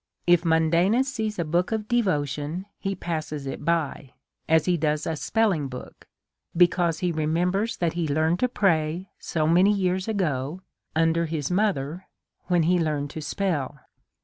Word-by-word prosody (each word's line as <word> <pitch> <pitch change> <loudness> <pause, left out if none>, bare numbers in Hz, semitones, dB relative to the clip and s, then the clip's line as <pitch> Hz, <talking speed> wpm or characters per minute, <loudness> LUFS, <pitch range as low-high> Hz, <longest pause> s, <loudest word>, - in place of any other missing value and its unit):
If 175 -1 +4
Mundanus 170 +9 +3
sees 215 -1 -2
a 170 - -1
book 175 +5 0
of 215 -1 -2
devotion, 155 - -1
he 195 0 -2
passes 155 -5 -4
it 135 - -5
by 155 -5 -1 0.4
as 160 -1 +4
he 180 - +2
does 150 -2 0
a 160 - -1
spelling 190 -4 +1
book, 125 -1 -10 0.5
because 175 -2 +3
he 180 -1 +1
remembers 175 +7 0
that 170 -2 0
he 170 -2 -1
learned 160 +4 +1
to 250 - +3
pray 175 -4 0
so 155 -2 -1
many 180 +5 +5
years 185 -1 0
ago 170 -6 -1 0.3
under 165 +1 +2
his 155 -1 -3
mother, 180 -4 -1 0.4
when 175 -2 +3
he 175 +2 +3
learned 150 -3 -1
to 160 - -6
spell. 150 -4 -2
170 Hz, 155 wpm, -25 LUFS, 155-185 Hz, 0.5 s, many